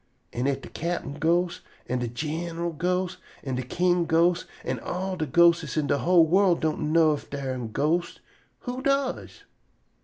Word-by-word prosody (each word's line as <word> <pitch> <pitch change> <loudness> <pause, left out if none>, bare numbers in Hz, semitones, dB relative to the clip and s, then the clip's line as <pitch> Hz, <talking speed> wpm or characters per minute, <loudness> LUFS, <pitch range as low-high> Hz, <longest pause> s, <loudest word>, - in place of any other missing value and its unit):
An' 125 +3 -1
if 135 -1 -1
de - - -9
cap'n 165 -4 -4
ghost 170 +2 +1 0.3
an' 125 +1 -1
de 120 - -2
gin'ral 165 +7 -3
ghost 180 +3 -1 0.2
an' 135 - -3
de 125 - -1
king 175 +6 +1
ghost 170 +2 +2 0.2
an' - - -3
all 185 +1 -3
de 160 -4 -3
ghostes 170 +2 +3
in 155 - +1
de 140 - +1
whole 175 -2 +5
worl' 185 +2 +4
don' 155 -1 -1
know 160 -1 +5
ef 145 - -7
dar 140 -2 -4
am 125 -3 -4
ghostes, 160 +8 0 0.4
who 250 +1 -5
does?" 275 -1 -1
165 Hz, 175 wpm, -26 LUFS, 145-175 Hz, 0.4 s, whole